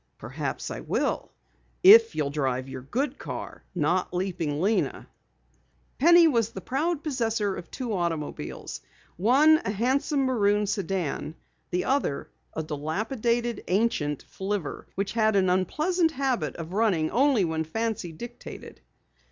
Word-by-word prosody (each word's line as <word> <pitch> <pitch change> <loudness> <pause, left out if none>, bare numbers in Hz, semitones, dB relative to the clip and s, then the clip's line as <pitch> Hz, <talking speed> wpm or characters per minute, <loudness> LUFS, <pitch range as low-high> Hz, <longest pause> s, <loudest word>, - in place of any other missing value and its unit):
"Perhaps - - -4
I - - -5
will, - - -1 0.5
if 225 0 +8
you'll 150 -2 -1
drive 130 -3 -1
your 130 -1 -7
good 255 - -2
car - - -7
not 175 +3 +1
Leaping 170 -5 -2
Lena." 190 -6 0 0.9
Penny 340 +3 +7
was 230 -7 +2
the 210 - -7
proud 300 - -1
possessor 225 -8 -1
of 175 - -8
two 250 -4 -4
automobiles, 170 -5 -4 0.4
one 285 - +5
a - - -2
handsome 260 +7 +1
maroon 210 -5 +2
sedan, 190 -6 -2 0.3
the 180 0 -1
other 270 - -1 0.2
a 160 - -2
dilapidated, 225 - -2
ancient 180 - 0
"flivver" 195 -5 -4
which 195 0 -2
had 220 -2 +2
an 185 -2 +3
unpleasant 310 - +1
habit 270 -4 -1
of 165 +1 -7
running 195 -7 +2
only 260 -6 +3
when 160 -1 -1
fancy 220 +2 -3
dictated. 240 - -10
205 Hz, 130 wpm, -27 LUFS, 165-245 Hz, 0.9 s, if